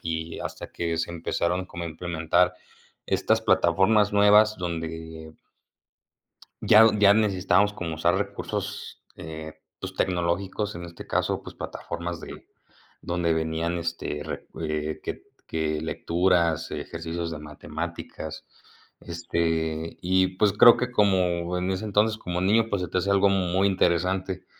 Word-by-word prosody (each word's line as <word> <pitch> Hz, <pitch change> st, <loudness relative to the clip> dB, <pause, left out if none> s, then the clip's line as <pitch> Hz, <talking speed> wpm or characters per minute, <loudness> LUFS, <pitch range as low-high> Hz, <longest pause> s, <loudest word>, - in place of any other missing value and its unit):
y 80 Hz, 0 st, -4 dB
hasta -, -, -6 dB
que 85 Hz, -1 st, -2 dB
se 80 Hz, +1 st, -2 dB
empezaron 85 Hz, +2 st, -1 dB
como 85 Hz, -1 st, -7 dB
a 85 Hz, -, -3 dB
implementar 85 Hz, +2 st, +1 dB, 0.5 s
estas -, -, +1 dB
plataformas 100 Hz, +4 st, +3 dB
nuevas 105 Hz, +1 st, +5 dB
donde 80 Hz, -2 st, -6 dB, 1.3 s
ya 110 Hz, +1 st, +8 dB
ya 100 Hz, -1 st, +6 dB
necesitábamos 105 Hz, -1 st, +2 dB
como 85 Hz, -5 st, -5 dB
usar 85 Hz, +3 st, +2 dB
recursos, 100 Hz, 0 st, -4 dB
eh, 80 Hz, 0 st, -8 dB, 0.3 s
pues 95 Hz, 0 st, -6 dB
tecnológicos 95 Hz, +3 st, -1 dB
en 85 Hz, -, -7 dB
este 85 Hz, 0 st, -10 dB
caso, -, -, 0 dB
pues -, -, -11 dB
plataformas 85 Hz, 0 st, -5 dB
de -, -, -10 dB, 0.5 s
donde 85 Hz, -1 st, 0 dB
venían 80 Hz, +2 st, -1 dB
este 85 Hz, -3 st, -4 dB
re 80 Hz, -, -6 dB
eh, 75 Hz, -1 st, -3 dB
que -, -, -6 dB, 0.2 s
que 80 Hz, -1 st, -1 dB
lecturas, 85 Hz, -1 st, +1 dB
ejercicios 85 Hz, 0 st, -5 dB
de 75 Hz, -, -5 dB
matemáticas, 80 Hz, +1 st, -7 dB, 0.5 s
este 80 Hz, -1 st, -2 dB
y 95 Hz, +1 st, +1 dB
pues 105 Hz, +1 st, +3 dB
creo 115 Hz, +4 st, +8 dB
que 125 Hz, 0 st, -2 dB
como 90 Hz, -4 st, +2 dB
en 90 Hz, +1 st, -1 dB
ese 95 Hz, +3 st, -3 dB
entonces 105 Hz, +1 st, +2 dB
como 90 Hz, -4 st, -4 dB
niño, 110 Hz, +4 st, +3 dB
pues 100 Hz, -, 0 dB
se 90 Hz, -, -3 dB
te 90 Hz, -, -1 dB
hace 100 Hz, +2 st, 0 dB
algo 100 Hz, 0 st, +4 dB
muy 95 Hz, 0 st, +2 dB
interesante 95 Hz, 0 st, 0 dB
85 Hz, 135 wpm, -26 LUFS, 80-95 Hz, 1.3 s, ya